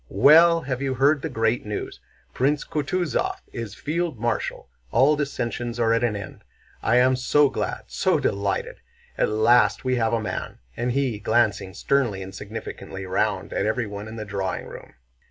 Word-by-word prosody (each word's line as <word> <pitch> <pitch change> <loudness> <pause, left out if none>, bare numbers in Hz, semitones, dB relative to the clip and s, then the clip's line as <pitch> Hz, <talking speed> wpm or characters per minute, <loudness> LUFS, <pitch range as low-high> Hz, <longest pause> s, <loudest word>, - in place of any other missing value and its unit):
"Well, 165 - +6
have 130 -3 -3
you 135 -1 -1
heard 140 +3 +3
the 160 - -3
great 115 -2 0
news? 105 -1 -5 0.3
Prince 140 +3 +1
Kutúzov 155 0 -1 0.2
is 115 -4 -6
field 165 -2 -2
marshal! 115 -1 -2 0.2
All 135 +6 +4
dissensions 120 -4 -3
are 115 -1 +3
at 115 - +1
an 115 -3 +1
end! 100 -3 -8 0.4
I 120 - +2
am 130 +1 +5
so 140 +3 +3
glad, - - -3
so - - +1
delighted! 100 0 -1 0.4
At - - +1
last 110 +5 +3
we 130 -1 +1
have 115 -1 +1
a 115 - +2
man!" 110 - -5 0.2
said 120 +1 -1
he, 130 -6 0
glancing 105 -4 +1
sternly 120 -9 0
and 95 0 -9
significantly 100 -1 -7
round 90 - -1
at - - 0
everyone 105 -2 -3
in 110 - -8
the 110 -1 -5
drawing 100 -2 -3
room. - - -11
120 Hz, 170 wpm, -24 LUFS, 105-140 Hz, 0.4 s, Well